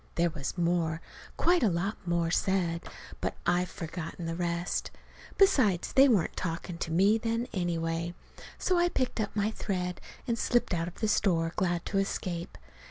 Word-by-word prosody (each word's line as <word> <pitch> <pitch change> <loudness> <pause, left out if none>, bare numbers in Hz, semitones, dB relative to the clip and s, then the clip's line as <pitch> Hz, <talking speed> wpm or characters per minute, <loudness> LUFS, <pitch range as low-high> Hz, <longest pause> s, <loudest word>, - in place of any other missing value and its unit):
There 170 0 +2
was 150 +2 -5
more, 170 -2 +1 0.4
quite 350 +1 +4
a 225 - +4
lot 190 +5 -1
more, 170 -1 +1
said. 175 -3 +1 0.4
But - - -1
I've 175 +1 +2
forgotten 165 +1 -6
the 165 - -2
rest. 170 0 -1 0.5
Besides, 225 - +4
they 270 +1 +7
weren't 205 -9 +2
talking 170 0 -4
to 170 - -3
me 200 +6 +4
then, 230 +1 -1
anyway. 170 -2 -1 0.4
So 365 -2 +2
I 350 0 +3
picked 255 -7 -1
up 205 - -3
my 210 +1 +1
thread 180 -4 -3 0.3
and 230 -2 0
slipped 240 -5 +2
out 165 -1 0
of 175 - -9
the 220 - +2
store, 170 -5 +2
glad 175 -4 0
to 195 - 0
escape. 180 -3 -3
175 Hz, 165 wpm, -30 LUFS, 170-210 Hz, 0.5 s, they